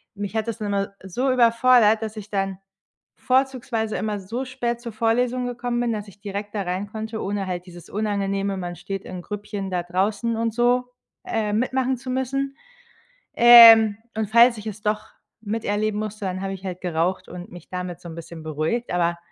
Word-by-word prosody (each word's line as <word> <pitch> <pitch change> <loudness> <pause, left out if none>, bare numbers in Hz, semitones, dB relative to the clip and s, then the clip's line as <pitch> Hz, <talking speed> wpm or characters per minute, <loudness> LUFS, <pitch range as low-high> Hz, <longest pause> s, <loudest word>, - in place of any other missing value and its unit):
mich 205 +1 -5
hat 220 0 -1
das 230 - -4
dann 210 - -3
immer 200 0 -1
so 245 +8 -1
überfordert, 230 -2 +5
dass 220 0 -5
ich 210 0 -8
dann 195 -2 -1 0.6
vorzugsweise 255 -4 0
immer 210 +1 -2
so 225 +7 -4
spät 240 -2 -3
zur 235 - -6
Vorlesung 245 +3 +1
gekommen 245 0 -2
bin, 235 -2 0
dass 210 -1 -5
ich 200 - -18
direkt 205 0 -5
da 200 - -1
reinkonnte, 205 +5 -4
ohne 200 -1 -2
halt 180 -1 -4
dieses 175 -2 -12
unangenehme 200 -1 -1
man 175 -1 -5
steht 195 +2 -6
in 185 -1 -7
Grüppchen 205 0 -5
da 180 -1 -1
draußen 200 +6 0
und 230 -1 -1
so, 245 +2 +2 0.4
äh, 215 -2 -1
mitmachen 260 +3 +1
zu 255 +1 -9
müssen, 275 +1 -2 0.8
ähm, 230 -3 +9 0.2
und 220 -2 -2
falls 235 +1 +6
ich 210 - -9
es 210 0 -6
doch 215 +1 -1 0.3
miterleben 215 -1 -1
musste, 215 -1 -5
dann 185 0 -3
habe 195 0 -3
ich 190 0 -9
halt 185 -1 -5
geraucht 175 +1 -1
und 180 0 -9
mich 175 -2 -12
damit 180 -1 -5
so 175 - -9
'n 165 - -8
bisschen 165 -1 -9
beruhigt. 155 +10 -2
Aber 170 -1 +1
210 Hz, 185 wpm, -23 LUFS, 190-235 Hz, 0.8 s, ähm